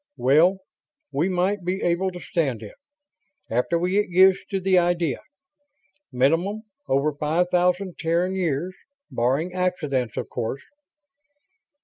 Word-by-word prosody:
"Well, 155 +9 +4 0.5
we 150 +7 0
might 185 +2 0
be 185 +2 -2
able 175 +2 +1
to 180 -1 -9
stand 135 - -2
it, - - -10 0.8
after 125 +9 +1
we 180 +4 +1
got 205 - -7
used 185 +2 +4
to 195 - -1
the 185 -1 +3
idea. 175 -3 0 0.9
Minimum, 165 - +1 0.2
over 140 +3 +1
five 160 +5 0
thousand 180 +1 +1
Terran 170 +3 0
years... 180 -1 -1 0.4
barring 135 +9 0
accidents, 150 - -1
of - - -3
course?" 120 +4 -4
175 Hz, 125 wpm, -24 LUFS, 145-185 Hz, 0.9 s, Well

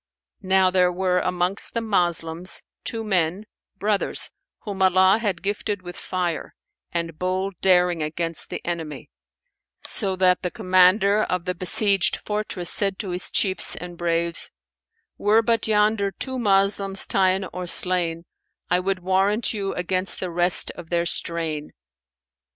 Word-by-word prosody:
Now 190 -1 +2
there 180 -1 +3
were 180 0 0
amongst 180 +4 -1
the - - +1
Moslems 175 -5 -1 0.2
two 225 -2 -4
men, 185 -1 -1 0.3
brothers, 205 0 +1 0.3
whom 200 -3 -6
Allah 190 +2 +4
had 200 -7 -3
gifted 205 -1 -3
with 175 -1 -9
fire 175 -3 -4 0.4
and 165 -2 -4
bold 185 +2 -2
daring 180 -3 +3
against 165 +2 -1
the - - -7
enemy; 165 -3 -6 0.7
so 195 -4 -2
that 185 -1 +2
the 180 - -2
commander 185 +4 +3
of 180 -4 -2
the 180 - -1
besieged 185 +2 +2
fortress 210 -4 -1
said 195 -2 0
to 195 -5 -5
his 180 +1 0
chiefs 190 -3 +2
and 175 0 -8
braves, 170 0 -2 0.7
"Were 215 +2 +3
but 230 -1 +1
yonder 210 -1 +2
two 260 +6 -4
Moslems 195 -2 +2
ta'en 190 0 +1
or 180 -1 -6
slain, 170 -2 +4 0.5
I 180 - +3
would 185 0 -3
warrant 195 +5 +1
you 200 -2 -3
against 185 +1 0
the 185 -2 -4
rest 175 +1 +2
of 165 -2 -12
their 170 -1 0
strain." 160 -3 -2
185 Hz, 140 wpm, -22 LUFS, 175-200 Hz, 0.7 s, Allah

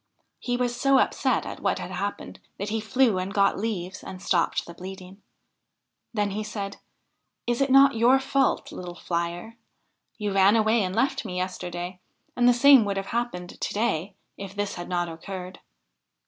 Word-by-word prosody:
He 245 -1 -1
was 245 -1 0
so 275 +2 +3
upset - - +1
at - - -6
what - - 0
had - - -6
happened, - - -4 0.2
that 205 - -4
he 220 +1 -1
flew 220 -2 +2
and 185 +1 -3
got 200 -1 +2
leaves 190 -4 -4
and 185 - -8
stopped 175 -2 +1
the 170 - -10
bleeding. 190 +2 -10 0.9
Then 205 -3 0
he 215 +2 -3
said: 205 -2 -5 0.7
'Is 240 +2 0
it 275 - +2
not 275 +1 +7
your 240 +4 +4
fault, 270 0 0
little 175 -1 -7
flier? 175 +6 -4 0.6
You 210 -2 -2
ran 195 +2 +5
away 220 +1 +3
and 185 -1 -2
left 265 +5 +1
me 185 -5 -5
yesterday, 180 -1 -4 0.4
and 245 0 +4
the - - +8
same 260 0 +7
would 200 -1 -2
have 195 0 -4
happened 230 -7 -3
to - - -2
day 205 -4 -1 0.2
if 195 0 -8
this 205 -1 -2
had 175 - -7
not 175 -1 0
occurred.' 180 +2 -7
200 Hz, 175 wpm, -26 LUFS, 185-235 Hz, 0.9 s, the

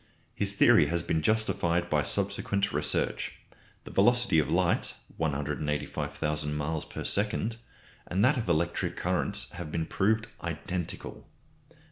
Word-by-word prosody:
His - - +1
theory 75 - +6
has 85 +2 0
been 80 -1 0
justified 85 -4 +1
by 75 -3 +2
subsequent 100 +2 0
research. - - 0 0.5
The - - -10
velocity 120 -4 +4
of 75 - 0
light - - +1 0.2
(185,000 75 0 -2
miles 75 +1 -2
per - - -6
second) 105 +2 0 0.5
and 95 +5 +2
that 130 - +4
of 115 -8 -2
electric 85 +1 0
currents - - -1
have 85 -4 -7
been 80 0 -1
proved 110 +6 +1 0.2
identical. 85 +1 -5
85 Hz, 125 wpm, -29 LUFS, 75-100 Hz, 0.5 s, theory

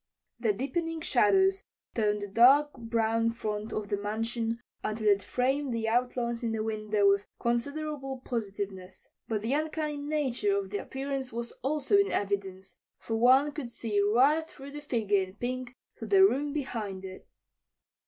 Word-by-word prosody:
The 230 -3 +2
deepening 325 - -2
shadows 385 +3 +3 0.3
toned 210 -2 0
the - - -4
dark 265 +8 +5
brown 230 -1 0
front 215 -2 -4
of 210 -1 -3
the 205 - 0
mansion 225 +3 -2 0.2
until 215 0 -2
it 200 -1 +4
framed 260 +2 0
the 225 -1 -1
outlines 235 0 0
in 230 -2 -1
the 220 -1 -1
window 215 -2 +1
with 200 0 +3
considerable 270 +3 -2
positiveness. 200 -5 -5 0.2
But 215 -2 -2
the 235 +4 0
uncanny 305 0 -1
nature 285 -9 0
of 195 -1 -4
the 205 - -1
appearance 270 -1 -4
was 235 +1 -4
also 295 +7 +2
in 400 - +2
evidence, 195 -2 -3 0.2
for 225 - -4
one 260 +5 +5
could 290 -5 -6
see 225 -3 -1
right 270 +10 +3
through 275 0 -11
the 295 +1 -7
figure 220 -8 +1
in 185 0 -6
pink 250 +2 -4 0.2
to - - -6
the 385 -1 +7
room 290 -4 +1
behind 220 -10 -4
it. 185 0 -10
235 Hz, 160 wpm, -29 LUFS, 210-280 Hz, 0.3 s, the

